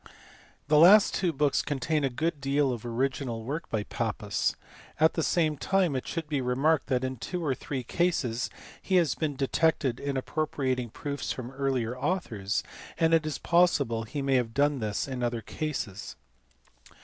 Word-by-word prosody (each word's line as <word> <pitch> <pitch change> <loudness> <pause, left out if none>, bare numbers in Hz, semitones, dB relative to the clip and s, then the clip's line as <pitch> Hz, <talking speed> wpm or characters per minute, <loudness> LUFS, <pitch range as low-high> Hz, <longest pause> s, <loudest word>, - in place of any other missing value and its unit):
The 150 +1 +5
last 195 +6 +8
two 180 -3 +1
books 145 -2 +1
contain 145 +2 -1
a 135 - +2
good 155 +3 -2
deal 140 -1 +1
of 115 - -6
original 125 -1 -2
work 145 +8 -4
by 110 -2 -1
Pappus; - - -2 0.4
at 160 +1 +5
the 165 - -1
same 155 -2 +1
time 185 -1 +1
it 130 - -3
should 165 -3 -4
be 145 -3 -1
remarked 135 +4 +1
that 130 -2 0
in 130 0 -3
two 175 +8 -4
or 140 - +2
three 130 0 -5
cases 130 -7 0 0.3
he 190 - 0
has 170 -7 +4
been 155 -3 -2
detected 135 -2 +1
in 140 -1 -2
appropriating 130 -3 -1
proofs 140 +5 -4
from 125 -1 -5
earlier 135 -3 -1
authors, 125 - -2 0.3
and 165 -1 +3
it 160 -1 +3
is 155 - -2
possible 155 -10 +2
he 135 +6 -4
may 135 -1 +3
have 115 -2 -2
done 145 0 +2
this 105 +1 -2
in 130 -2 -4
other 120 -1 -1
cases. 120 -8 -4
140 Hz, 175 wpm, -28 LUFS, 125-155 Hz, 0.4 s, last